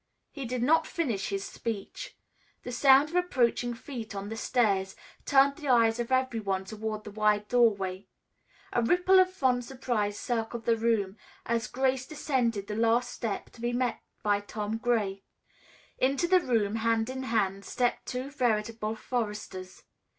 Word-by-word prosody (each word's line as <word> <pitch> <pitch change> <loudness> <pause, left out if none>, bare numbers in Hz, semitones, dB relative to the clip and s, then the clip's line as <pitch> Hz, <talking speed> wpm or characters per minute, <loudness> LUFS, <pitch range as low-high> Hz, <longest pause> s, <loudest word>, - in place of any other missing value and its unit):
He 275 -3 -6
did 245 0 -2
not 320 +5 +3
finish 240 - -2
his 195 -1 -2
speech. 230 - -6 0.5
The 245 - -5
sound 270 +3 +5
of 340 - -7
approaching 245 -8 +1
feet 230 -4 -7
on 200 +1 -5
the 225 - -4
stairs 200 -5 +1 0.3
turned 275 0 +5
the 295 - -7
eyes 230 -2 +4
of 240 +1 -3
every 260 -3 +1
one 190 -2 -2
toward 215 +1 -5
the 210 - -8
wide 210 0 +1
doorway. 200 -6 +2 0.7
A - - +2
ripple 360 +9 +4
of 370 0 +4
fond 260 -9 +1
surprise 235 -5 -2
circled 230 -1 -3
the 230 - +3
room, 220 -3 0 0.3
as 230 0 0
Grace 260 0 0
descended 245 -9 -1
the 210 - -5
last 230 +2 +2
step 215 -4 -4
to 235 - -15
be 240 0 -1
met 245 -1 -1 0.2
by 205 -1 +2
Tom 210 +1 -4
Gray. 215 -5 0 0.8
Into 275 +6 +2
the 370 +1 +5
room, 225 - 0
hand 225 0 +1
in 260 0 -4
hand, 200 -6 0
stepped 245 +3 -1
two 255 +2 -4
veritable 225 -4 -1
foresters. 210 -6 -5
230 Hz, 160 wpm, -29 LUFS, 210-260 Hz, 0.8 s, sound